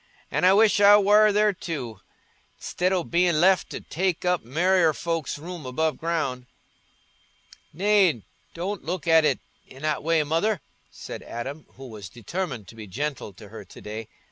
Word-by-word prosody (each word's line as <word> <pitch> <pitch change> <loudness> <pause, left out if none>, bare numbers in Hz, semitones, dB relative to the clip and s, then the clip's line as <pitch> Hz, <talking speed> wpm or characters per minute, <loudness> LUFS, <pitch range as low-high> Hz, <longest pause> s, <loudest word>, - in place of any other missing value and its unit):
An' - - +1
I 185 - +7
wish 210 0 +4
I 205 +1 +8
war 210 +1 +5
there 210 0 +3
too, 135 - -6 0.6
i'stid 180 +1 -1
o' 185 -2 +1
bein' 170 -1 +2
left 185 +2 +3
to - - -6
take 180 0 -2
up 180 -1 +1
merrier 165 +6 +2
folks's 165 -2 -3
room 170 +2 -8
above 155 +5 -1
ground." 150 -7 -2 1.2
"Nay, 190 - +2 0.3
don't 190 +4 -4
look 175 +1 -4
at 160 -1 +5
it - - +2 0.3
i' 130 - -13
that 155 +2 -2
way, 160 0 +2
Mother," 165 +7 0 0.3
said - - -9
Adam, 135 +6 -7
who 135 - -11
was 105 -6 -9
determined 120 - -5
to - - -13
be 110 -2 -9
gentle 135 +2 -4
to 100 +2 -14
her 110 0 -9
to 95 - -15
day. 110 +1 -7
165 Hz, 170 wpm, -25 LUFS, 130-185 Hz, 1.2 s, I